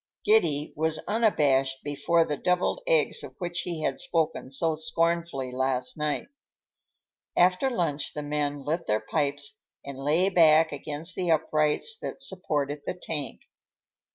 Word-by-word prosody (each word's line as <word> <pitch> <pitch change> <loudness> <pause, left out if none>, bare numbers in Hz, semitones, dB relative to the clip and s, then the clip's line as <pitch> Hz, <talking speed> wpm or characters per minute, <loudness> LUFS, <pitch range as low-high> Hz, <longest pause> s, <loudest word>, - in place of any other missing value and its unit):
Giddy 160 -9 +2
was 160 +1 +1
unabashed 140 - +2
before 165 +3 +1
the 150 - -2
devilled 180 - 0
eggs - - +2
of - - -10
which 175 -2 -3
he 170 -3 -4
had 135 - -1
spoken 160 -5 -1
so 160 +4 0
scornfully 165 -4 -1
last 130 0 0
night. 150 -1 -1 1.1
After 180 +9 +4
lunch 165 - -1
the 150 - -3
men 145 -1 -2
lit 165 +3 -2
their 105 0 +2
pipes 145 0 -2 0.3
and 140 -1 -7
lay 155 +7 +2
back 160 -3 +5
against 150 +4 -3
the 180 -2 -2
uprights 155 - +2
that - - -6
supported 145 -6 -2
the - - -2
tank. 155 -5 -4
155 Hz, 140 wpm, -27 LUFS, 145-175 Hz, 1.1 s, back